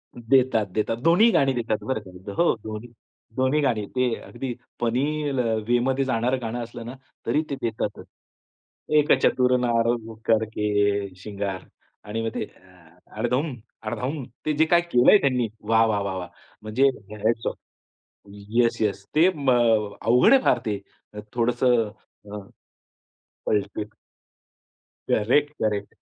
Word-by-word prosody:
देतात-देतात. 115 -4 +1
दोन्ही 175 +8 +5
गाणी 135 -6 +3
देतात 115 -3 -2
बरं 130 -4 0
का 95 -3 -13
तिथं 95 +2 -9
हो 170 - +3
दोन्ही 110 +2 -7 0.5
दोन्ही 130 +3 +2
गाणी, 115 -7 0
ते 125 -2 +2
अगदी 125 +1 -5 0.3
फनी 120 +3 +1 0.3
ल, 135 - -1 0.3
वेमधे 130 +3 +2
जाणारं 125 0 0
गाणं 115 +1 -3
असलं 115 0 -9
ना 120 - -6 0.3
तरी 150 - +2
ते 140 - -2
देतातच. 110 -2 -3 0.9
"एक 150 - +2
चतुर 125 0 +3
नार 115 -1 +1 0.4
करके 110 -1 +1 0.5
शृंगार" 100 -2 -4 0.4
आणि 110 +2 -4
मग - - 0
ते - - -1
अ, 90 -3 -22 0.3
अडधम-अडधम 125 +1 -3 0.2
ते 155 - +1
जे 155 +2 +3
काही 170 +2 +4
केलं 125 -8 +4
आहे - - +9
त्यांनी 125 -4 +1 0.2
वाह, 115 0 +5
वाह, 105 -2 0
वाह, 100 -1 -3
वाह! 90 -1 -6 0.3
म्हणजे 115 +6 +2 0.4
हॅट्स 115 0 +1
ऑफ. - - -9 0.7
येस, 110 +4 0
येस 100 -2 -1
ते 165 +4 +6
म 140 -3 +1 0.5
अवघड 125 - +5
आहे 270 - +6
फार - - +3
ते. 105 -2 -1 0.6
थोडंसं 120 -1 +2 0.4
अ, 105 - -5 1.1
कळते. 105 0 -1 1.3
Correct, 145 +8 +2
correct. 105 -2 -2
115 Hz, 135 wpm, -24 LUFS, 105-130 Hz, 1.3 s, आहे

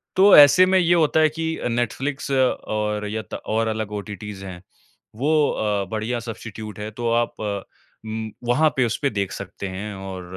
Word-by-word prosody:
तो 195 +1 +7
ऐसे 145 +5 +8
में 190 +1 +3
ये 175 -1 +3
होता 160 -2 +3
है 155 0 +5
कि 160 +2 -4 0.2
नेटफ्लिक्स 130 +5 -2
और 105 -5 0
यत 110 0 -6
और 110 +1 -1
अलग 110 -1 -3
ओटीटीस 105 -1 -7
हैं 90 -2 -8 0.5
वो 150 +5 +2
अ, 105 -2 -1
बढ़िया 110 +2 -2
सबस्टीट्यूट 110 -2 -8
है। 105 +1 -5
तो 115 +2 -2
आप 120 0 0 0.7
म 110 0 -4 0.2
वहाँ 155 +6 +4
पे 130 - +3
उसपे 130 +5 -1
देख 100 -5 -2
सकते 100 0 -6
हैं 100 +3 -5
और 95 -1 -7
110 Hz, 170 wpm, -22 LUFS, 105-140 Hz, 0.7 s, ऐसे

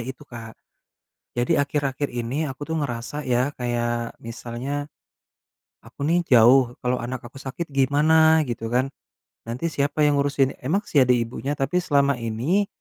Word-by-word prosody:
itu 130 +4 -8
Kak, 115 -3 -10 0.8
jadi 120 +3 +2
akhir-akhir 140 -1 -2
ini 125 +6 -2
aku 130 +2 -7
tuh 160 - -1
ngerasa 125 +3 -4
ya, 125 +3 +1
kayak, 120 -1 -2
misalnya 125 +5 -5 1.0
aku - - -10
nih 170 +2 +2
jauh, 125 0 +6
kalo 125 0 0
anak 125 +1 -4
aku 120 - -14
sakit 150 +5 -5
gimana 155 +4 +4
gitu 115 -1 -4
kan. 130 +2 +2 0.6
Nanti 120 +8 -3
siapa 145 +2 +1
yang 145 - +3
ngurusin, 140 -1 +1
emang 175 +11 0
sih 140 -4 +4
ada 125 - +2
ibunya, 120 +4 -2
tapi 180 +7 0
selama 140 -3 +2
ini, 130 - 0
135 Hz, 150 wpm, -24 LUFS, 120-145 Hz, 1.0 s, jauh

